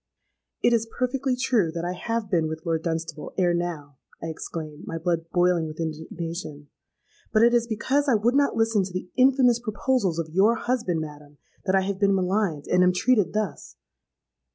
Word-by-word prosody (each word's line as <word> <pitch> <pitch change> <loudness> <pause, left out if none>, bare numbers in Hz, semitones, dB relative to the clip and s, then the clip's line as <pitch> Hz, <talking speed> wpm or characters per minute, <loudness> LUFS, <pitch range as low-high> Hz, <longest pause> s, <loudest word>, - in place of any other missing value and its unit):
'—'It 240 - +4
is 225 -1 +1
perfectly 255 +1 0
true 245 -9 +1
that 170 +1 -4
I 180 - -2
have 230 +4 -3
been 170 -5 +1
with 160 0 -6
Lord 165 -1 0
Dunstable 160 -2 -4
ere 180 -2 +3
now,' 160 -6 -4 0.2
I 165 - -5
exclaimed, 155 -1 -7
my 165 - -3
blood 165 -1 -1
boiling 175 -2 +2
with 155 +1 -9
indignation: 160 -1 -5 0.6
'but 220 0 +4
it 235 +1 +5
is 235 -1 +2
because 270 +6 0
I 245 - +5
would 225 +4 +2
not 280 0 +2
listen 225 -3 +2
to 185 -1 -7
the 185 0 -5
infamous 255 -2 +4
proposals 215 -5 0
of 160 -2 -3
your 205 +6 +4
husband, 225 -9 -1
madam, 150 -1 -10 0.3
that 190 -1 +2
I 190 - +4
have 190 0 -3
been 200 -1 +3
maligned, 185 -5 0
and 180 - +3
am 180 0 +4
treated 220 +1 +2
thus.' 215 -3 -3
185 Hz, 185 wpm, -25 LUFS, 165-230 Hz, 0.6 s, it